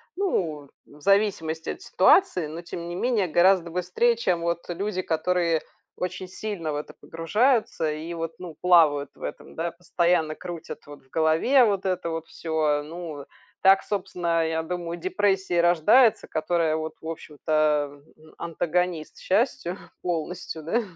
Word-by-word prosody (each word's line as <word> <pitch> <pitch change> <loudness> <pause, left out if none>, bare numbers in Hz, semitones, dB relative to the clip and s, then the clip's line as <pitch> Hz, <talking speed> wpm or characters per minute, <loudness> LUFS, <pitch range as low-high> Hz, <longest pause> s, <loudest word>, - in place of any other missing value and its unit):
ну, 160 - -1 0.2
в 145 +1 -18
зависимости 185 -5 +1
от 365 - -9
ситуации, 185 - +4
но 155 +3 -7
тем 170 0 -7
не 175 - -5
менее 220 -1 +1
гораздо 175 +1 +3
быстрее, 180 +7 +1
чем 180 -7 0
вот 170 0 -2
люди, 185 +2 -2
которые 170 -1 +1 0.4
очень 185 +1 -4
сильно 185 -5 -4
в 145 - -2
это 150 - -7
погружаются 210 - +1
и 155 +3 -5
вот, 165 -1 -4
ну, 175 -3 -8
плавают 155 -6 +4
в - - -21
этом, - - -7
да, 165 +1 -2
постоянно 170 -2 0
крутят 170 -3 -8
вот 145 -2 -12
в 130 - -29
голове 160 - +4
вот 200 -2 0
это 185 -2 -1
вот 165 0 -4
всё. 155 -2 0
Ну 155 -2 -7 0.4
так, 195 0 +6
собственно, 175 -4 -1
я 160 0 -1
думаю, 170 0 -4
у - - -15
депрессии 190 -1 0
и - - +4
рождается, 175 +8 +4
которая 160 0 0
вот, 160 0 -4
в 160 - -8
общем-то, 150 -2 -1 0.4
антагонист 170 0 -2
счастью 195 -3 0 0.2
полностью, 170 -1 -4
да. 225 +10 +1
170 Hz, 150 wpm, -25 LUFS, 160-185 Hz, 0.4 s, так